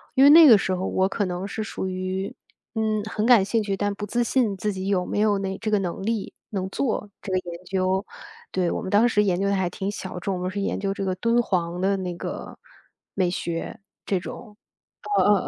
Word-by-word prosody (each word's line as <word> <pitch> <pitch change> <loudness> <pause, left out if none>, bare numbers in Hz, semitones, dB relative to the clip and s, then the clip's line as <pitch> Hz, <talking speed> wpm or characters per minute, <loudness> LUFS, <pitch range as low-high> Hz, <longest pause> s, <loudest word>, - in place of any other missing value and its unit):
因 265 - +6
为 280 - +9
那 325 +2 +10
个 230 -5 +9
时 190 -1 -1
候 185 +1 -3
我 190 0 +1
可 200 +1 -1
能 180 +1 -3
是 215 +2 -4
属 195 - -4
于， 185 +1 -3 0.4
嗯， 220 -1 0
很 215 -1 -1
感 235 -5 +6
兴 225 +2 +1
趣 200 -1 -2
但 205 0 0
不 205 - -5
自 240 +4 0
信 230 -4 +1
自 210 +2 -1
己 190 0 -4
有 190 -2 +1
没 - - -3
有 210 -1 +3
那 195 -1 -3
这 220 -1 -2
个 210 - +3
能 180 -2 -3
力 220 0 -2 0.2
能 190 -2 -3
做 215 -2 -2
这 195 - -6
个 185 - +2
研 170 +1 -8
究。 190 +1 0 0.5
对， 180 -2 +1
我 - - -2
们 - - -5
当 210 +4 +5
时 210 -3 +3
研 185 -3 +1
究 200 - +1
得 200 - +2
还 190 -2 0
挺 190 +2 -4
小 190 -3 -5
众， 190 +2 -2
我 180 - -4
们 180 +1 -2
是 200 - -4
研 200 - -1
究 195 0 -1
这 195 0 -4
个 185 -1 -1
敦 230 +5 +2
煌 175 -5 -1
的 195 +2 +2
那 180 -2 -3
个 - - -6 0.6
美 185 -2 +1
学 175 +5 -4 1.2
这 410 - +1
种。 - - +3
嗯 205 - +6
195 Hz, 255 characters per minute, -24 LUFS, 185-215 Hz, 1.2 s, 那